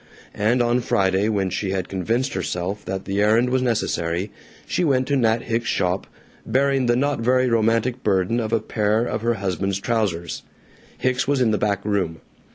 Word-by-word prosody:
And 120 Hz, +4 st, +2 dB
on 120 Hz, +1 st, +2 dB
Friday, 95 Hz, -1 st, +1 dB
when 100 Hz, -3 st, 0 dB
she 100 Hz, -, -2 dB
had 95 Hz, -1 st, -2 dB
convinced 115 Hz, +8 st, -1 dB
herself 95 Hz, +2 st, -3 dB
that 95 Hz, 0 st, -4 dB
the 100 Hz, +1 st, -1 dB
errand 115 Hz, +4 st, +3 dB
was 130 Hz, 0 st, +2 dB
necessary, 100 Hz, -6 st, -1 dB, 0.3 s
she -, -, -1 dB
went 130 Hz, -5 st, +2 dB
to 140 Hz, -, +2 dB
Nat 115 Hz, -3 st, +2 dB
Hicks's 115 Hz, 0 st, -1 dB
shop, 90 Hz, +1 st, 0 dB, 0.4 s
bearing 135 Hz, -1 st, +1 dB
the 120 Hz, -, +3 dB
not 140 Hz, +2 st, 0 dB
very 125 Hz, +2 st, +2 dB
romantic 115 Hz, +2 st, +1 dB
burden 100 Hz, +3 st, +1 dB
of 110 Hz, -2 st, -3 dB
a 115 Hz, -, +3 dB
pair 110 Hz, +1 st, 0 dB
of 110 Hz, -, -3 dB
her 120 Hz, +1 st, +1 dB
husband's 95 Hz, -1 st, -2 dB
trousers. 100 Hz, -7 st, -1 dB, 0.6 s
Hicks 130 Hz, +1 st, 0 dB
was 140 Hz, -1 st, +2 dB
in 120 Hz, -3 st, +3 dB
the 105 Hz, -, 0 dB
back 100 Hz, -1 st, -1 dB
room. 95 Hz, -6 st, -1 dB
110 Hz, 180 wpm, -22 LUFS, 95-120 Hz, 0.6 s, errand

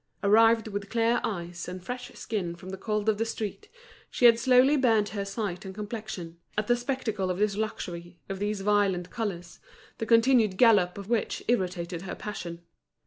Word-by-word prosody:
Arrived 225 Hz, +2 st, +5 dB
with 200 Hz, -1 st, -5 dB
clear 230 Hz, +1 st, +2 dB
eyes 175 Hz, -4 st, -4 dB
and 180 Hz, 0 st, -7 dB
fresh 250 Hz, +2 st, -6 dB
skin 185 Hz, -6 st, -3 dB
from 180 Hz, +2 st, -11 dB
the 190 Hz, -, -4 dB
cold 210 Hz, +1 st, -2 dB
of 215 Hz, -1 st, +2 dB
the -, -, +2 dB
street, 225 Hz, -, -5 dB, 0.4 s
she 245 Hz, -, +1 dB
had 230 Hz, -1 st, +7 dB
slowly 260 Hz, +3 st, +5 dB
burnt 225 Hz, -6 st, +3 dB
her 200 Hz, -1 st, -3 dB
sight 200 Hz, -2 st, -4 dB
and 190 Hz, -1 st, -8 dB
complexion, 210 Hz, -6 st, -6 dB, 0.2 s
at 210 Hz, -, +1 dB
the 240 Hz, -, +3 dB
spectacle 240 Hz, -6 st, -2 dB
of 180 Hz, -, -1 dB
this 205 Hz, 0 st, +1 dB
luxury, 175 Hz, -5 st, -5 dB
of 195 Hz, -1 st, -5 dB
these 205 Hz, 0 st, -2 dB
violent 195 Hz, -3 st, +1 dB
colours, 180 Hz, -6 st, -5 dB, 0.4 s
the 225 Hz, -, -3 dB
continued 230 Hz, -4 st, +4 dB
gallop 205 Hz, -7 st, +5 dB
of 200 Hz, -1 st, -7 dB
which 230 Hz, -1 st, -1 dB
irritated 180 Hz, -6 st, -1 dB
her 190 Hz, -, -6 dB
passion. 175 Hz, -5 st, -6 dB
205 Hz, 180 wpm, -28 LUFS, 185-230 Hz, 0.4 s, had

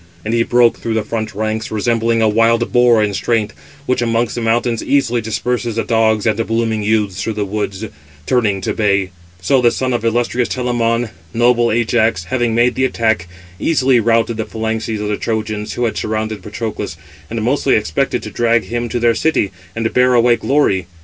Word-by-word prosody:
And 110 Hz, -, -1 dB
he 115 Hz, -, +2 dB
broke 120 Hz, 0 st, +3 dB
through 115 Hz, -1 st, -3 dB
the 110 Hz, -, 0 dB
front 110 Hz, -1 st, -4 dB
ranks, 110 Hz, +1 st, -2 dB
resembling 115 Hz, +1 st, +1 dB
a -, -, +4 dB
wild 115 Hz, +2 st, +2 dB
boar 120 Hz, -3 st, +5 dB
in 105 Hz, -1 st, -1 dB
strength, 110 Hz, +2 st, -1 dB, 0.3 s
which 125 Hz, -2 st, 0 dB
amongst 115 Hz, -1 st, 0 dB
the 120 Hz, -, -4 dB
mountains 115 Hz, 0 st, 0 dB
easily 125 Hz, -4 st, +1 dB
disperses 120 Hz, +1 st, -2 dB
the 115 Hz, -, 0 dB
dogs 110 Hz, -1 st, +1 dB
and 110 Hz, 0 st, +1 dB
blooming 115 Hz, -1 st, 0 dB
youths 105 Hz, -3 st, 0 dB
through 110 Hz, -, -2 dB
the 105 Hz, -, -1 dB
woods, 100 Hz, 0 st, -3 dB, 0.4 s
turning 105 Hz, -5 st, +1 dB
to -, -, -2 dB
bay; 100 Hz, -3 st, +1 dB, 0.3 s
so 130 Hz, +7 st, +3 dB
the 120 Hz, -, +5 dB
son 130 Hz, +1 st, -2 dB
of 120 Hz, -, -1 dB
illustrious 120 Hz, +1 st, 0 dB
Telamon, 120 Hz, -2 st, 0 dB, 0.3 s
noble 120 Hz, 0 st, +3 dB
Ajax, 115 Hz, -4 st, +1 dB
having 120 Hz, +2 st, -1 dB
made 120 Hz, +1 st, +3 dB
the 130 Hz, -, -1 dB
attack, 110 Hz, -8 st, 0 dB, 0.3 s
easily 135 Hz, -6 st, +2 dB
routed 115 Hz, 0 st, +1 dB
the 110 Hz, -, -2 dB
phalanxes 110 Hz, 0 st, -3 dB
of 105 Hz, -, -2 dB
the 105 Hz, -, -1 dB
Trojans 110 Hz, -2 st, -3 dB
who 120 Hz, -, -1 dB
had 115 Hz, -, -2 dB
surrounded 110 Hz, 0 st, -3 dB
Patroclus, 105 Hz, -4 st, -5 dB, 0.3 s
and 115 Hz, -, -3 dB
mostly 135 Hz, +3 st, +2 dB
expected 105 Hz, -8 st, -1 dB
to -, -, -7 dB
drag 115 Hz, -1 st, +2 dB
him 120 Hz, 0 st, -3 dB
to 120 Hz, -, -2 dB
their 120 Hz, 0 st, +3 dB
city, 155 Hz, -8 st, 0 dB, 0.2 s
and 110 Hz, 0 st, -2 dB
bear 125 Hz, 0 st, +4 dB
away 120 Hz, 0 st, +4 dB
glory. 110 Hz, -, +1 dB
115 Hz, 190 wpm, -17 LUFS, 110-120 Hz, 0.4 s, boar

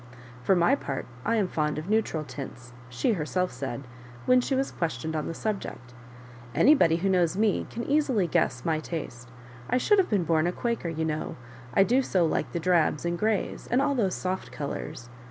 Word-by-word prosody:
"For 190 Hz, +9 st, +3 dB
my 175 Hz, +9 st, +4 dB
part, 140 Hz, -, -2 dB, 0.2 s
I 230 Hz, -, +1 dB
am 210 Hz, -4 st, +2 dB
fond 150 Hz, -3 st, -1 dB
of 155 Hz, +3 st, -5 dB
neutral 210 Hz, -7 st, +1 dB
tmts," 125 Hz, -4 st, -8 dB, 0.2 s
she 125 Hz, -, +1 dB
her 170 Hz, -7 st, -2 dB
self 180 Hz, +1 st, 0 dB
said, 135 Hz, -1 st, -5 dB, 0.4 s
when 255 Hz, 0 st, +5 dB
she 265 Hz, -, -1 dB
was 270 Hz, +1 st, 0 dB
questioned 160 Hz, -1 st, -3 dB
on 155 Hz, -, -2 dB
the 165 Hz, -, -4 dB
sub* 215 Hz, +1 st, -1 dB
ject; 125 Hz, 0 st, -9 dB, 0.3 s
" 120 Hz, -1 st, -17 dB
anybody 185 Hz, -, +5 dB
who 175 Hz, +4 st, 0 dB
knows 180 Hz, -2 st, +2 dB
me 215 Hz, -1 st, +1 dB
can 235 Hz, -, -5 dB
easily 275 Hz, -, +2 dB
gnesa 130 Hz, -5 st, 0 dB
my 160 Hz, -2 st, +1 dB
taste. 130 Hz, -8 st, -6 dB, 0.4 s
I -, -, +3 dB
should 410 Hz, +11 st, +4 dB
have 375 Hz, -, +2 dB
been 200 Hz, -5 st, +2 dB
born 165 Hz, 0 st, +2 dB
a -, -, +1 dB
Quaker, 235 Hz, -3 st, -2 dB
you 160 Hz, 0 st, -2 dB
know, 155 Hz, -1 st, -3 dB, 0.4 s
I -, -, +7 dB
do 250 Hz, +6 st, +3 dB
so 185 Hz, -9 st, +2 dB
like 160 Hz, -, -1 dB
the 170 Hz, -, -2 dB
drabs 170 Hz, -2 st, +2 dB
and 170 Hz, 0 st, 0 dB
greys, 215 Hz, +3 st, -1 dB
and 245 Hz, -, +3 dB
all 285 Hz, +1 st, +2 dB
those 205 Hz, -8 st, +1 dB
soft 185 Hz, +1 st, -3 dB
colours. 140 Hz, -4 st, -5 dB
175 Hz, 210 wpm, -27 LUFS, 150-220 Hz, 0.4 s, I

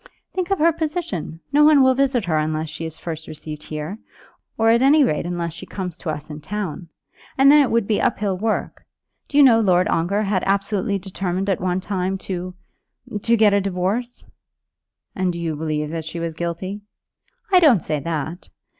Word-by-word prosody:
"Think 370 Hz, -1 st, -2 dB
of 390 Hz, -, +1 dB
her 335 Hz, +1 st, +4 dB
position. 300 Hz, -, -4 dB
No 295 Hz, +1 st, +6 dB
one 295 Hz, -2 st, +6 dB
will 260 Hz, 0 st, +5 dB
visit 260 Hz, -4 st, +1 dB
her 160 Hz, -3 st, +1 dB
unless 155 Hz, +1 st, -2 dB
she 160 Hz, +1 st, -6 dB
is 160 Hz, -1 st, -7 dB
first 160 Hz, -2 st, -6 dB
received 155 Hz, -1 st, -7 dB
here, 155 Hz, +7 st, -6 dB, 0.6 s
or 225 Hz, 0 st, +4 dB
at 235 Hz, +1 st, +3 dB
any 285 Hz, +3 st, +6 dB
rate 170 Hz, -, 0 dB
unless 170 Hz, -2 st, -3 dB
she -, -, -9 dB
comes 180 Hz, -4 st, -5 dB
to 170 Hz, -, -5 dB
us 150 Hz, -2 st, -4 dB
in 150 Hz, 0 st, -8 dB
town. 180 Hz, -2 st, -5 dB, 0.5 s
And 275 Hz, +1 st, +7 dB
then 295 Hz, 0 st, +7 dB
it 275 Hz, -, +2 dB
would 230 Hz, -2 st, +1 dB
be 210 Hz, 0 st, 0 dB
up -, -, +1 dB
hill 200 Hz, -2 st, -1 dB
work. 215 Hz, +4 st, -2 dB, 0.4 s
Do 285 Hz, -, -2 dB
you 290 Hz, -, +8 dB
know 235 Hz, -4 st, +6 dB
Lord 185 Hz, -4 st, +3 dB
Ongar 195 Hz, +6 st, +1 dB
had 195 Hz, -2 st, 0 dB
absolutely 200 Hz, 0 st, 0 dB
determined 190 Hz, 0 st, -2 dB
at 185 Hz, -, -1 dB
one 185 Hz, 0 st, 0 dB
time 190 Hz, 0 st, -2 dB
to 185 Hz, -1 st, -5 dB, 0.7 s
to 235 Hz, +2 st, +2 dB
get 210 Hz, -2 st, +5 dB
a 200 Hz, -, +3 dB
divorce?" 195 Hz, +6 st, -2 dB, 0.9 s
"And 185 Hz, -1 st, 0 dB
do 170 Hz, -, -6 dB
you 165 Hz, -2 st, -2 dB
believe 150 Hz, -1 st, -2 dB
that 165 Hz, -1 st, -4 dB
she 165 Hz, +2 st, -5 dB
was 165 Hz, -1 st, -3 dB
guilty?" 175 Hz, +5 st, -4 dB, 0.7 s
"I 370 Hz, -, +7 dB
don't 270 Hz, -, +5 dB
say 150 Hz, -1 st, -1 dB
that. 160 Hz, +3 st, -4 dB
185 Hz, 200 wpm, -21 LUFS, 165-225 Hz, 0.9 s, you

